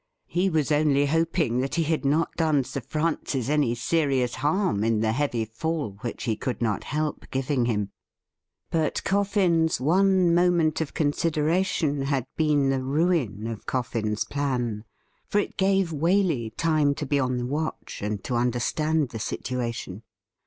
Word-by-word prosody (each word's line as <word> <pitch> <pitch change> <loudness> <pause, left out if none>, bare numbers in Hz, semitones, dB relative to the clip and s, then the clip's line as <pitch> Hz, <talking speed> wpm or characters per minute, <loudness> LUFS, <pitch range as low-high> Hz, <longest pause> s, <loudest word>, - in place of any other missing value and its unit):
He 180 +2 0
was 155 -4 0
only 145 -1 +3
hoping 160 -4 +1
that 135 +1 -1
he 170 - +2
had 160 0 -1
not 150 +4 +1
done 155 -4 +2
Sir 140 - -5
Francis 150 -3 -2
any 145 -5 +2
serious 135 -2 +1
harm 150 - 0
in 110 -1 +1
the 110 0 +2
heavy 120 -3 0
fall 115 -2 -3
which 120 - -5
he 115 -3 0
could 125 +3 -3
not 110 -4 -1
help 150 +1 -3
giving 135 -1 0
him. 105 -4 -1 0.8
But 160 -2 0
Coffin's 190 -5 +2
one 185 +4 +3
moment 170 -3 +3
of 155 - -4
consideration 155 0 +1
had 135 -2 0
been 145 -3 +2
the 135 -1 0
ruin 135 - 0
of 115 -2 -6
Coffin's 115 -4 -1
plan, 125 -6 -2 0.4
for - - 0
it 205 - 0
gave 195 -2 +2
Waley 160 - +1
time 155 -3 +2
to 150 - -4
be 140 +1 +1
on 130 -1 0
the 120 - -2
watch, 150 +5 -4
and 105 -1 -3
to 125 - -3
understand 125 +5 0
the 115 - -6
situation. 115 -4 -4
145 Hz, 155 wpm, -26 LUFS, 120-165 Hz, 0.8 s, only